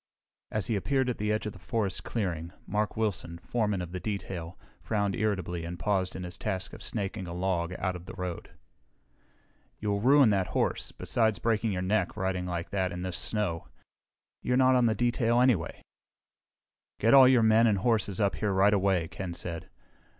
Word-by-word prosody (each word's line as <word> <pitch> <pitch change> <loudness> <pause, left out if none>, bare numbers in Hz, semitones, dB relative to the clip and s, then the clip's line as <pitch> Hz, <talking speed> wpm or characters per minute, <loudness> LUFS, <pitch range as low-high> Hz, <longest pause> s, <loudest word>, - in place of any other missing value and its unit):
As 105 -3 -2
he 110 - 0
appeared 130 +5 +1
at - - -7
the 105 0 0
edge 105 0 -1
of 105 - -4
the - - -13
forest 105 -5 -2
clearing, 85 -7 -3
Mark 105 +1 -1
Wilson, 100 -6 -1
foreman 105 0 -1
of 85 - -8
the 90 - -4
detail, 90 -5 -5 0.2
frowned 100 -3 -1
irritably 90 -5 -1
and 85 +1 -5
paused 95 0 0
in 95 - -5
his 90 0 -7
task 95 -3 -3
of - - -10
snaking 100 -3 -3
a 85 - -6
log 90 -1 -1
out 95 - -1
to 90 - -7
the 90 - -10
road. 90 -2 -5 1.3
"You'll 100 -1 -1
ruin 135 -1 +6
that 95 -2 +1
horse, - - 0
besides 110 -3 0
breaking 115 -1 0
your 90 -1 -2
neck, 95 -1 0
riding 95 -1 -1
like 85 0 -4
that 95 -2 0
in 90 +1 -5
this 90 -1 -3
snow. 100 -7 -2 0.7
You're 125 - +1
not 130 0 +5
on 125 -2 +4
detail, 120 +1 +2
anyway." 120 -10 +1 1.2
"Get 115 +2 +4
all 135 -2 +9
your 125 -3 +5
men 110 +1 +5
and 105 -3 +3
horses 105 -2 0
up 100 -2 +1
here 105 -2 0
right 100 +2 +4
away," 95 -4 +2
Ken 90 0 -6
said. 85 -2 -5
100 Hz, 185 wpm, -29 LUFS, 90-110 Hz, 1.3 s, all